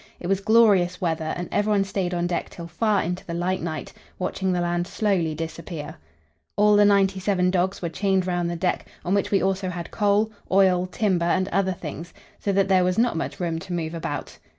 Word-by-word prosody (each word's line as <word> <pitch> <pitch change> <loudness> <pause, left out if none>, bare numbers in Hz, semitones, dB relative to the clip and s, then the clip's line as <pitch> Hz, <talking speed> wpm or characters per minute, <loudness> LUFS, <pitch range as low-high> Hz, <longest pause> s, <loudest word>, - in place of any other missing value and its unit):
It - - -9
was 195 +1 +1
glorious 200 -5 +4
weather, 160 -2 -1
and 175 0 -4
everyone 205 -1 +2
stayed 190 -2 -2
on 175 -1 -1
deck 175 0 -2
till 170 - -9
far 205 +5 +1
into 180 +2 -3
the 170 - -5
light 180 +2 -1
night, 160 -2 -5 0.2
watching 190 +1 -1
the 180 - 0
land 175 0 -1
slowly 185 -9 0
disappear. 160 -1 -6 0.6
All 210 0 +5
the 205 0 +6
ninety 195 -1 +3
seven 185 -2 +1
dogs 185 +1 0
were 170 - -1
chained 190 +1 0
round 175 -1 -1
the 170 - -3
deck, 180 +2 -1 0.2
on 180 - 0
which 200 - +1
we 200 - +2
also 190 -1 0
had 175 -2 -6
coal, 210 +1 +2 0.2
oil, 185 -2 +4
timber 185 -2 0
and 185 +2 +1
other 190 +1 +1
things, 165 0 -8 0.2
so 200 - -1
that 195 0 +2
there 190 -2 +4
was 180 0 0
not 235 -4 +2
much 165 - -4
room 165 -2 -1
to 180 +1 -7
move 165 -2 -3
about. 145 -4 -5
180 Hz, 210 wpm, -24 LUFS, 170-195 Hz, 0.6 s, the